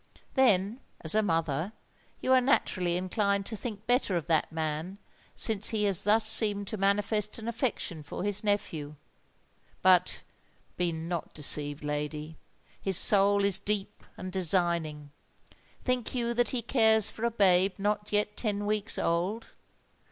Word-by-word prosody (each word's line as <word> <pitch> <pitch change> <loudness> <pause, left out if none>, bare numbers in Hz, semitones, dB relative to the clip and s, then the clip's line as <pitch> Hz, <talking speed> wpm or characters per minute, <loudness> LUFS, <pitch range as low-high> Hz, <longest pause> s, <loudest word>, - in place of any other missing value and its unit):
Then, 220 -3 +2 0.2
as 160 - +3
a 215 - +3
mother, 165 0 -1 0.5
you 260 - +2
are 260 - +5
naturally 180 -9 +1
inclined 200 +2 -1
to 220 - -5
think 210 -1 -7
better 245 -7 +1
of 165 - -4
that 160 -1 0
man 160 +4 -4 0.4
since 215 -2 +1
he 215 -2 -1
has 195 -4 +4
thus 215 +1 +3
seemed 205 -2 +5
to - - -4
manifest 205 +2 0
an 225 0 -8
affection 230 - -3
for 145 +4 -7
his 205 +1 -1
nephew. 160 -8 -2 0.9
But, 185 -1 +3 0.5
be 175 -1 0
not 165 +1 -5
deceived, 145 0 +2
lady—his 150 +5 -5
soul 200 0 +2
is 195 -1 +2
deep 205 -1 -3
and 185 0 -7
designing! 170 -5 -1 0.7
Think 250 -1 -2
you 235 -1 -1
that 240 0 +1
he 245 -3 -2
cares 220 -3 +4
for 225 - -9
a 235 - +2
babe 190 -3 +3
not 210 +1 -2
yet 210 0 0
ten 205 -3 -2
weeks 210 0 -2
old? 180 +7 -2
200 Hz, 145 wpm, -28 LUFS, 170-215 Hz, 0.9 s, are